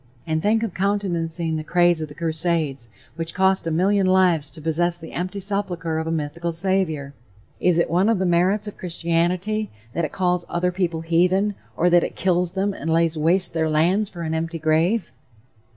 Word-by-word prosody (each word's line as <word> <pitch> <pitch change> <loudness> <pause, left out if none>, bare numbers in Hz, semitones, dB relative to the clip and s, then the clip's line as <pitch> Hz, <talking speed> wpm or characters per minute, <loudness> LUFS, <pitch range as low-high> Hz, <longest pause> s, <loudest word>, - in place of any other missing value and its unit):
And 160 -1 -1
think 220 +4 +2
of 220 -6 -3
countenancing 170 -4 -1
the 155 - -4
craze 175 0 +2
of 155 - -3
the 145 - -13
crusades, 160 -6 -1 0.3
which 165 0 -4
cost 190 -1 +2
a - - +1
million 190 +4 +2
lives 180 -6 +3
to 160 - -11
possess 170 +2 0
the 165 -1 -9
empty 185 +3 -4
sepulchre 180 -5 -1
of 160 - -4
a - - -1
mythical 165 +2 -3
Savior! 165 -6 -1 0.5
Is 180 -2 +2
it 170 - +2
one 185 +5 +2
of 225 - +2
the 190 - 0
merits 185 +5 +2
of 210 - -8
Christianity 180 +5 0 0.2
that 170 - -1
it 155 - -2
calls 180 -2 0
other 180 +1 0
people 175 -3 -2
"heathen," 180 +5 +2 0.2
or 175 - +3
that 175 0 +5
it - - -4
kills 180 -1 +1
them 195 +1 0
and 165 -2 -4
lays 165 0 +2
waste 170 +4 +2
their 160 -1 0
lands 180 +7 +2
for 170 -2 -7
an 160 0 -2
empty 165 +1 -2
grave? 165 +7 +1
170 Hz, 195 wpm, -22 LUFS, 160-190 Hz, 0.5 s, that